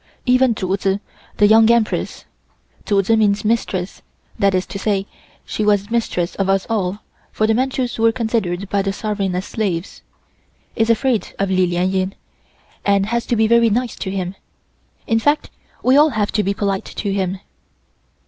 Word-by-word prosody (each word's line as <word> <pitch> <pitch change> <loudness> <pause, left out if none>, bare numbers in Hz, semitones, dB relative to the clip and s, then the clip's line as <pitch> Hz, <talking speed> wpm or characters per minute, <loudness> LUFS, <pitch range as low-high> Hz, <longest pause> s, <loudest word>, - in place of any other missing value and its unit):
Even 255 -1 +3
Chu 190 -2 -1
Tzu, 195 0 0 0.4
the 205 - +5
Young 220 +2 +6
Empress 235 -2 0 0.6
(Chu 200 -1 +3
Tzu 225 +4 +3
means 210 -1 +2
Mistress, 200 -4 -1 0.4
that 200 -2 +3
is 185 0 0
to 200 - -7
say 200 -2 0 0.4
she 215 - -3
was 205 0 +1
mistress 195 -7 -1
of 195 -1 0
us 195 0 +2
all, 205 -2 -1 0.3
for 215 - 0
the 220 - +2
Manchus 255 0 -1
were 225 0 +4
considered 220 -6 -2
by 200 +1 0
the 195 0 -2
sovereign 200 -3 -2
as 185 +2 -2
slaves) 185 -6 -3 0.7
is 225 -1 +1
afraid 230 0 +1
of 195 -1 -1
Li 185 -1 +3
Lien 175 +1 0
Ying, 190 0 -1 0.7
and 200 -1 +2
has 235 +2 -2
to 240 - +1
be 220 0 +3
very 235 +1 +4
nice 240 +2 -1
to 190 - -4
him. 185 -1 -3 0.7
In 225 -1 +2
fact, 290 +6 +1 0.3
we 255 +1 +4
all 300 +2 +6
have 215 -6 -1
to 215 - +1
be 200 0 -1
polite 195 -1 -1
to 200 -2 -4
him." 190 -1 -1
205 Hz, 175 wpm, -19 LUFS, 195-225 Hz, 0.7 s, Young